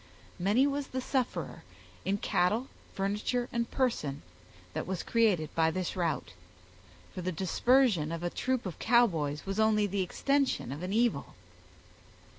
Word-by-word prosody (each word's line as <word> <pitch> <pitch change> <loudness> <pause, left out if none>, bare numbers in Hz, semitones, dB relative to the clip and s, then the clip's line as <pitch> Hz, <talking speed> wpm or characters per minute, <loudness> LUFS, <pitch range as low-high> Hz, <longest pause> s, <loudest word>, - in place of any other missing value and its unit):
Many 205 +9 +3
was 285 -1 -1
the 260 - -3
sufferer, 255 -1 -2 0.4
in 195 +1 +1
cattle, 205 +6 +1 0.3
furniture, 210 +5 -1
and 235 -1 -1
person, 155 - -1 0.5
that - - -3
was 185 -2 -3
created 210 -9 +2
by 160 -1 +3
this 185 +1 -3
rout; 165 - -1 0.8
for 185 - -5
the 185 +1 -2
dispersion 190 - +2
of 165 0 -4
a 175 - -1
troop 255 -2 -1
of 180 -4 -6
Cowboys 170 -12 +2
was 195 +2 -3
only 215 -1 +4
the 200 0 -1
extension 275 - 0
of 145 +3 -6
an 180 +1 -3
evil. 235 +2 +1
200 Hz, 145 wpm, -30 LUFS, 175-245 Hz, 0.8 s, only